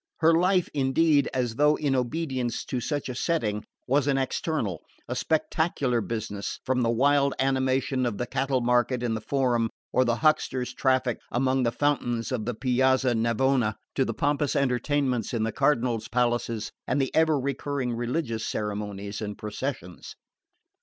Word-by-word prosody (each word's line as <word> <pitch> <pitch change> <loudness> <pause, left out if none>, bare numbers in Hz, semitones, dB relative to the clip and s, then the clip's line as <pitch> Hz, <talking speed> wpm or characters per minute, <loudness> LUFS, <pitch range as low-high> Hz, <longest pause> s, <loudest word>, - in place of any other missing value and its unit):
Her 165 +1 +4
life, 180 +2 +3
indeed, 145 +1 +3
as 120 -3 -2
though 150 +1 +4
in 140 -3 0
obedience 130 -1 -2
to 125 - -2
such 145 +2 -2
a 130 - -4
setting, 115 -8 -1 0.2
was 140 +2 +2
an 140 -1 +2
external, 130 - -2 0.3
a 125 - -3
spectacular 145 -3 0
business, 110 -3 -4
from 130 0 +1
the 115 - +2
wild 140 +4 +3
animation 130 -1 +1
of 110 -4 -3
the 120 - -2
cattle 135 +1 0
market 125 +1 +1
in 120 -2 0
the 110 - -3
Forum 120 -2 +1 0.2
or 130 - +4
the 120 -2 +1
hucksters' 130 -3 +1
traffic 130 -2 +1
among 130 +1 +1
the 120 -2 +1
fountains 120 -5 0
of 115 -4 -2
the 120 -1 -2
Piazza 130 +1 +2
Navona, 115 0 +1 0.2
to 135 - +2
the 115 -3 -3
pompous 145 -1 0
entertainments 130 -2 0
in 110 - 0
the 115 - 0
cardinals' 120 -4 +1
palaces 120 -3 -1 0.2
and - - +1
the 135 -2 -1
ever 160 -2 +3
recurring 135 -1 -2
religious 120 -1 -2
ceremonies 105 -1 -4
and 105 -1 -5
processions. 105 -4 -6
125 Hz, 160 wpm, -26 LUFS, 115-140 Hz, 0.3 s, Her